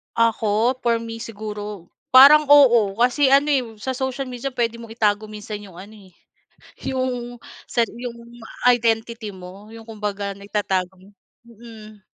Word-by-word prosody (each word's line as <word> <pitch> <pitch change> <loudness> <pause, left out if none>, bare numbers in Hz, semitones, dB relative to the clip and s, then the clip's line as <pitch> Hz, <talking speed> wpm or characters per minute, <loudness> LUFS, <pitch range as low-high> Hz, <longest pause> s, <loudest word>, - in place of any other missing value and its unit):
Ako, 230 +1 +1
for 235 -1 +1
me 230 0 -7
siguro, 210 -4 -7 0.2
parang, 280 +4 +8
oo. 235 -8 +5
Kasi 265 +3 +3
ano, 280 +2 +4
eh, 280 -3 +2 0.2
sa 260 +3 -4
social 265 0 -3
media 255 +2 -5
pwede 235 -2 -1
mong 230 -1 -11
itago 210 -1 +1
minsan 210 0 -8
yung 185 -3 -13
ano, 210 +3 -12
eh, 195 -3 -17 0.8
yung 245 -2 -4 0.3
sa 235 -2 +1
yung 240 0 -8 0.5
identity 230 -2 +1
mo 190 +3 -12
yung 225 0 -12
kumbaga, 205 -2 -4
naitatago 190 -2 -3 0.5
mm. 220 -2 -14
225 Hz, 140 wpm, -21 LUFS, 210-245 Hz, 0.8 s, parang